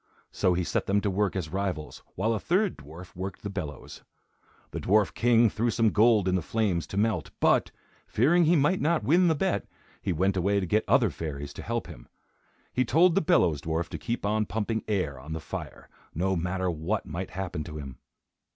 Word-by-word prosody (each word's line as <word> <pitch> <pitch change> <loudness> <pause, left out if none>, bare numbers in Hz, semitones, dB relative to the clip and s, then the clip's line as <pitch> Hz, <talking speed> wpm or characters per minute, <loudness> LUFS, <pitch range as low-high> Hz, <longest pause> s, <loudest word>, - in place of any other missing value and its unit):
So 90 -1 +1
he 90 - 0
set - - -2
them 100 +1 +3
to 100 - 0
work 100 +1 0
as 90 -5 -3
rivals, 95 -6 -3
while 110 +5 +1
a 110 - -1
third 190 - +1
dwarf 85 +5 -12
worked 95 +1 -6
the 100 - -4
bellows. 80 -8 -7 0.7
The - - -4
dwarf 105 0 +2
king 120 -1 +4
threw 115 +3 0
some 115 -1 +2
gold 110 -3 +4
in 90 - +2
the 90 - +1
flames 90 -5 -1
to 95 - -6
melt; 105 -7 0
but, - - +3 0.4
fearing 165 +9 +3
he 170 +3 +4
might 150 +5 +2
not 165 +2 +1
win 175 +5 +4
the 160 - +3
bet, 190 +4 -1 0.3
he 95 - -1
went 95 +4 +1
away 100 +2 +1
to 95 - -2
get 105 +5 +1
other - - +4
fairies 70 -3 -6
to - - -8
help - - -3
him. - - -12 0.7
He 130 - +2
told 165 +8 +4
the 195 - +3
bellows 85 - +2
dwarf 80 +2 -2
to - - -6
keep 120 -3 -3
on 105 0 +1
pumping 110 +1 -2
air 90 -11 -1
on 75 +5 -7
the 80 - -3
fire, 80 - -7 0.3
no 95 +4 0
matter 90 +1 -1
what 85 +6 -2
might 90 +4 -5
happen 90 -5 -4
to 75 -2 -7
him. 70 -4 -8
95 Hz, 205 wpm, -27 LUFS, 85-115 Hz, 0.7 s, king